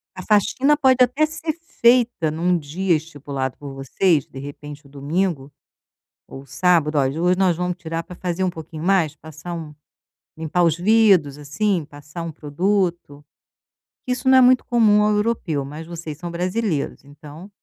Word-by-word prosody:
A 185 - -7
faxina 220 +8 +2
pode 260 -3 +4
até 260 +5 +2
ser 315 +1 -4 0.3
feita 235 -8 +4
em 155 - -6
um 175 +1 +2
dia 170 +4 -1
estipulado 145 -4 -5
por 140 -1 -9
vocês, 145 +3 +1
de 135 - -10
repente 145 +1 -9
o - - -17
domingo 145 +1 -2 0.8
ou 135 +1 -11
sábado: 155 +2 +1
"Olha, 140 +3 0
hoje 180 +1 +2
nós 185 -3 +2
vamos 180 0 -2
tirar 165 -1 -5
pra 180 - -11
fazer 180 +1 -3
um 185 - +1
pouquinho 160 -2 -9
mais", 175 -5 +2
passar 160 +3 -9
um 160 -3 -7 0.6
limpar 160 +2 -1
os 165 -2 +2
vidros, 190 -7 +3
assim, 165 +5 -1
passar 145 +2 -10
um 165 -1 -5
produto, 170 0 -2 0.8
que 255 - -3
isso 250 +1 -3
não 260 0 +7
é - - +7
muito 250 0 +5
comum 215 -3 +4
ao 210 - +2
europeu, 210 -9 -1
mas 150 +4 -9
vocês 165 -3 -7
são 175 +1 -6
brasileiros, 180 -2 -2
então 150 +5 -13
170 Hz, 170 wpm, -21 LUFS, 150-200 Hz, 0.8 s, não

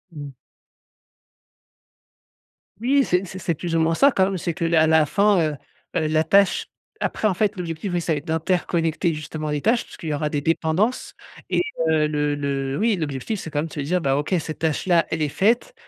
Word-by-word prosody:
Mmh. 145 -1 -7 2.5
Oui, 275 +3 +3
c'est 180 -4 0
c'est 185 +1 -8
c'est 170 -2 -1
plus 165 +2 -3
ou - - +3
moins 165 +1 +2
ça, 280 +7 +5
quand 190 - +3
même, 195 -1 -2
c'est 170 0 -3
que 170 - -4
la 165 -1 +3
la 160 -1 +4
fin, 200 +3 +3
heu, 145 - -8 0.4
la 155 0 +1
tâche 195 +3 +3 0.3
après, 215 - 0
en 190 - +1
fait, 210 +3 0
l'objectif 175 +1 -4
c'est 160 -3 -1
d'interconnecter 165 0 0
justement 155 0 -5
les 145 -1 -1
tâches, 235 +2 +2
puisqu'il 160 -5 -8
y - - 0
aura 150 +1 -1
des 145 -1 -2
dépendances 165 - 0 0.4
et - - +2 0.3
heu, 155 -1 +3
le 150 -1 0
le 140 -1 -2
oui, 220 -1 +2
l'objectif, 155 +6 -3
c'est 160 - -7
quand 145 - -2
même 160 - -1
de - - -13
se - - -5
dire: 175 +6 0
«Bah, 135 -2 +1
OK, 150 +6 -2
cette 155 0 -6
tâche-là, 165 +2 +1
elle 160 -1 -2
est 150 - +1
faite» 230 - +1
165 Hz, 195 wpm, -23 LUFS, 150-190 Hz, 2.5 s, ça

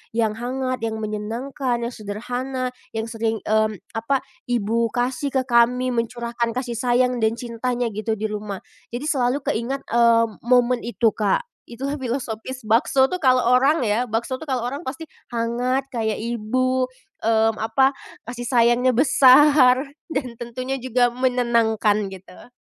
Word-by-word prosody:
yang 225 -2 +2
hangat, 255 +1 -2
yang 225 -1 -2
menyenangkan, 235 +4 -3
yang 235 - -3
sederhana, 250 +4 -4 0.2
yang 220 - -1
sering 225 -1 -2
mmm 215 0 +1 0.2
apa, 240 +4 -1 0.2
ibu 230 -1 +1
kasih 250 +3 -1
ke 260 - +3
kami, 250 +1 +3
mencurahkan 235 0 -2
kasih 245 -3 -3
sayang 250 0 +2
dan 220 0 +1
cintanya 240 0 -3
gitu 215 +1 -2
di 215 - -8
rumah. 205 -2 -5 0.3
Jadi 255 - -4
selalu 265 0 0
keingat 260 +5 -2
eee 235 -1 +5 0.2
momen 245 0 +4
itu 235 -2 +2
Kak. 210 - 0 0.2
Itulah 275 +5 -4
filosofis 255 0 -4
bakso 250 +5 +3
tuh 365 - -2
kalau 255 -4 +4
orang 260 +4 +3
ya, 225 +3 0
bakso 235 +4 -2
tuh 315 - -9
kalau 255 -4 -1
orang 275 +5 -5
pasti 270 +4 -5 0.3
hangat, 245 +3 0
kayak 220 -3 -1
ibu 255 +3 0 0.3
mmm 225 0 +2
apa, 225 +5 +3 0.3
kasih 240 0 -6
sayangnya 245 +1 +3
besar 270 0 +5 0.2
dan 275 -6 -2
tentunya 255 +3 -4
juga 245 -1 +1
menenangkan 235 -4 +1
gitu. 190 +2 -13
240 Hz, 145 wpm, -22 LUFS, 225-255 Hz, 0.3 s, eee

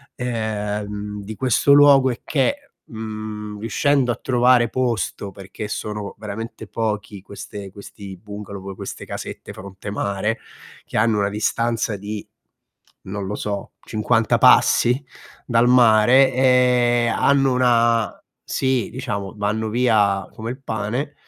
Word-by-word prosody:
ehm, 105 -3 -4
di 110 +2 -7
questo 130 +3 +2
luogo 140 -2 +7
è 120 - -4
che, 280 - -1
mhmm, 110 -1 -7
riuscendo 130 +3 +1
a - - -2
trovare 125 -1 +4
posto, 115 -5 -2
perché 100 +2 -8
sono 105 -2 -5
veramente 110 +2 -7
pochi 105 -3 -3
queste 100 -1 -9
questi 100 -1 -10
bungalow, 100 0 -8
proprio 95 0 -8
queste - - -7
casette - - -7
fronte 100 +1 -9
mare 100 +2 -2 0.5
che - - -5
hanno 110 -1 +2
una 100 0 +1
distanza 115 +1 -1
di, 105 +1 -6 0.8
non 100 +1 -5
lo 105 +2 -3
so, 100 -1 -4
50 110 +1 +1
passi 125 +4 +5 0.4
dal 120 0 +3
mare 125 +2 +5
e 125 -2 +3
hanno 135 -1 +3
una 115 -4 +2 0.2
sì, 130 -3 0
diciamo, 120 -7 -4
vanno 105 +2 -1
via 105 -5 +2
come 115 +2 -5
il 130 - -9
pane 125 +5 -3
110 Hz, 125 wpm, -21 LUFS, 105-125 Hz, 0.8 s, luogo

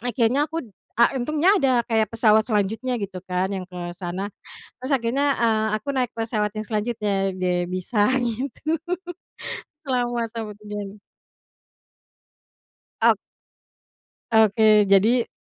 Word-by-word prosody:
akhirnya 245 +5 +1
aku 325 -2 -4 0.3
a 235 +3 +5
untungnya 305 +9 +2
ada 260 -5 +3
kayak 220 -2 +2
pesawat 220 -1 +4
selanjutnya 220 +3 -1
gitu 195 -2 -5
kan 185 +1 -1
yang 190 -1 -3
ke 180 - -11 0.2
sana. 185 +2 -4 0.5
Terus 260 +3 -5
akhirnya, 255 +4 0
eee, 220 -2 +2
aku - - -31
naik 250 -2 0
pesawat 225 -2 -1
yang 215 - -3
selanjutnya 215 -1 -1 0.2
ge 180 -1 0
bisa 195 +4 0 0.2
gitu 270 +7 -2 1.1
selamat 240 -3 0
sampai 220 -2 -5
tujuan. 205 -1 -6 2.1
Ok - - +5 1.1
Oke 215 -1 +5
jadi. 225 +5 +4
225 Hz, 115 wpm, -23 LUFS, 210-245 Hz, 2.1 s, a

